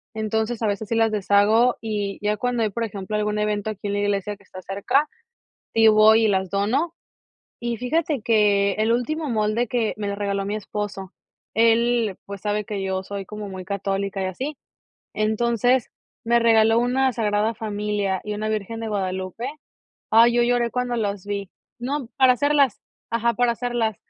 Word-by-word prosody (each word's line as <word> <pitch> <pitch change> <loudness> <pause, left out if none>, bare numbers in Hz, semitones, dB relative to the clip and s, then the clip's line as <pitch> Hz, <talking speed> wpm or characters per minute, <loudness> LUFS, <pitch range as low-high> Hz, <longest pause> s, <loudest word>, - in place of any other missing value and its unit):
Entonces, 220 +2 -1
a 220 - +2
veces 205 +1 -2
sí 230 - 0
las 225 -1 +3
deshago 210 +4 +3
y 210 -3 -3
ya 210 0 +2
cuando 245 0 0
hay, 215 - +1
por 230 +3 -2
ejemplo, 200 0 -5
algún 210 0 -1
evento 210 0 -1
aquí 205 0 -7
en 200 - -2
la 205 - 0
iglesia 205 0 -1
que 200 - -23
está 185 -1 -11
cerca, 200 +11 0 0.7
sí 225 0 +5
voy 220 +1 +6
y - - +4
las 190 -2 0
dono. 250 +12 0 0.7
Y 235 -1 -3
fíjate 295 +2 -1
que 205 -3 +3
el 220 +2 +1
último 300 +6 -1
molde 220 +1 0
que 230 -2 0
me 210 -1 -3
lo 200 - -2
regaló 200 -1 -2
mi 205 - -2
esposo, 205 -2 -5 0.4
él, 230 -1 +3
pues, 200 -1 -7
sabe 210 0 -1
que 200 -2 -4
yo 190 0 -1
soy 200 0 -6
como 210 0 -7
muy 185 -1 -7
católica 195 0 -2
y - - -1
así, 260 +11 -4 0.6
entonces 235 +3 +1 0.3
me 235 +1 +3
regaló 225 -1 +5
una 255 +2 +2
Sagrada 215 -1 0
Familia 205 -3 -2
y 210 0 -3
una 215 +1 -3
Virgen 215 +1 -3
de 225 - -4
Guadalupe. 190 +2 -3 0.7
Ay, 230 +2 +6
yo 240 0 +3
lloré 240 0 +2
cuando 250 -1 -1
las 200 -3 -2
vi. 200 -2 -4 0.3
No, 260 0 -3
para 260 -2 +6
hacerlas, 285 -1 +2 0.3
ajá, 235 +1 +1
para 245 -1 +2
hacerlas. 235 -3 -1
215 Hz, 180 wpm, -23 LUFS, 200-235 Hz, 0.7 s, voy